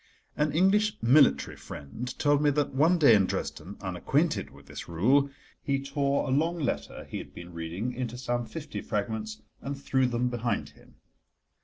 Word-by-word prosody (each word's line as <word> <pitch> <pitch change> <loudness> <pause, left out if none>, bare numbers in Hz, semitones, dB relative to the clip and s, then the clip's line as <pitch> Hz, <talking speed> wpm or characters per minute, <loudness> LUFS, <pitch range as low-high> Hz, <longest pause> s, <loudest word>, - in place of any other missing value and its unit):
An 150 0 +1
English 205 +6 +3
military 125 - +5
friend 110 - -7
told 145 0 +3
me 150 - +4
that, 145 -1 0
one 160 +6 +4
day 145 -8 +7
in 100 -3 +4
Dresden, - - -4
unacquainted - - 0
with - - -16
this - - -8
rule, 130 +12 +3 0.3
he 140 -1 0
tore 140 0 0
a - - -1
long 165 +6 +2
letter 120 - -3
he - - -5
had - - -11
been 85 0 -9
reading 85 +9 -4
into 125 -1 -4
some 120 -2 -2
fifty 155 -2 -6
fragments 110 +1 -3 0.2
and 140 0 -5
threw 130 -2 +2
them 125 0 0
behind 120 -1 -1
him. - - -21
130 Hz, 170 wpm, -28 LUFS, 110-145 Hz, 0.3 s, day